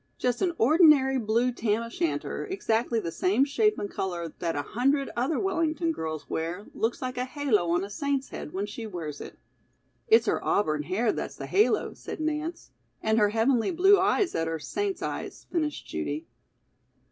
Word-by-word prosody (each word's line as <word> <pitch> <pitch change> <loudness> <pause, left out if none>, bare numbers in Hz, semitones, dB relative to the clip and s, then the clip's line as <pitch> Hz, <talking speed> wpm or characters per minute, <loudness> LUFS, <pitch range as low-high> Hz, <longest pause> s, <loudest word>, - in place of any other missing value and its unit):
Just 250 -1 0
an 365 -3 +2
ordinary 275 -1 +5
blue 235 +3 +1
tam 225 -1 0
o'shanter, 280 +9 -2
exactly 235 - 0
the 170 -6 -4
same 205 +11 +2
shape 425 +9 +2
and 205 - -3
color 175 -5 -4
that 170 -1 -1
a 145 - -1
hundred 275 - 0
other 260 +6 0
Wellington 335 -4 0
girls 155 - -5
wear, 170 +5 -3
looks 230 +3 -1
like 255 0 -3
a 250 - 0
halo 255 - 0
on 175 +2 +2
a 200 - -5
saint's 275 +3 -1
head - - -7
when 195 +4 -2
she 220 +2 -7
wears 160 -7 -6
it." - - -9 0.7
"It's 450 0 +6
her - - 0
auburn 155 -7 +1
hair 205 +10 0
that's - - -5
the - - -6
halo," 415 +3 +2
said - - -8
Nance. 315 +2 -3 0.3
"And 220 +1 +3
her 210 -1 +4
heavenly 230 +2 +2
blue 385 +3 +5
eyes 405 -4 +2
that 165 0 -1
are 165 0 -2
saint's 390 - -3
eyes," - - -5
finished 310 -4 -1
Judy. 145 - -4
240 Hz, 180 wpm, -27 LUFS, 190-310 Hz, 0.7 s, It's